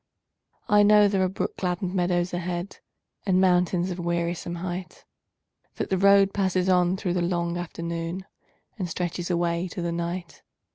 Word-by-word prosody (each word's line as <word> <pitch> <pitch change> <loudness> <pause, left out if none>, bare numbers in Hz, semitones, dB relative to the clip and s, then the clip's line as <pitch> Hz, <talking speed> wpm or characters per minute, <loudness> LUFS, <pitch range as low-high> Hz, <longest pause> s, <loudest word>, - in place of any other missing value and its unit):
I 210 0 +5
know 210 0 +6
there 195 -1 +1
are 185 - +1
brook 190 +1 -3
gladdened 180 0 -2
meadows 175 -1 0
ahead, 175 +1 -4 0.5
And 185 -1 +3
mountains 180 -1 +2
of 180 - -5
wearisome 170 0 -2
height; 175 +1 -6 0.7
That - - -4
the 190 - +2
road 200 0 +5
passes 190 -2 +1
on 180 0 +3
through 180 -3 -2
the 180 - 0
long 170 -1 -1
afternoon 170 +1 -4 0.5
And 180 -3 -2
stretches 175 +1 -3
away 170 0 0
to 180 - -6
the 170 - -1
night. 170 +1 -4
180 Hz, 155 wpm, -26 LUFS, 175-185 Hz, 0.7 s, know